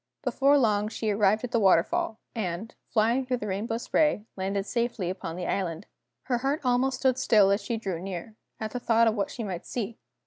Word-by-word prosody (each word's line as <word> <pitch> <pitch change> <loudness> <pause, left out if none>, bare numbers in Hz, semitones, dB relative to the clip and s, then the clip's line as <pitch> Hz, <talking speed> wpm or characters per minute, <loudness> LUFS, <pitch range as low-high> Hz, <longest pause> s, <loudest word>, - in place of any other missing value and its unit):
Before 280 +1 +3
long 210 -5 +2
she 220 0 -2
arrived 205 +2 +2
at 250 - -4
the 235 - +2
waterfall, 220 - +3 0.2
and, 205 0 -4 0.2
flying 230 +4 +2
through 255 0 -1
the 210 - -5
rainbow 210 +3 -2
spray, 245 -2 +1
landed 195 +1 -2
safely 235 -6 -1
upon 175 -3 -6
the 180 0 -4
island. 180 -1 -2 0.4
Her 245 -2 0
heart 275 +4 -1
almost 255 +1 +2
stood 260 -1 +2
still 210 -6 +5
as 200 +3 +2
she 235 - -2
drew 190 -6 -3
near, 195 +3 -6 0.2
at 220 -1 -4
the 250 - -3
thought 230 -1 +3
of 225 - +3
what 205 -2 -1
she 235 - -5
might 185 -5 -4
see. 230 -2 -4
220 Hz, 205 wpm, -27 LUFS, 195-245 Hz, 0.4 s, still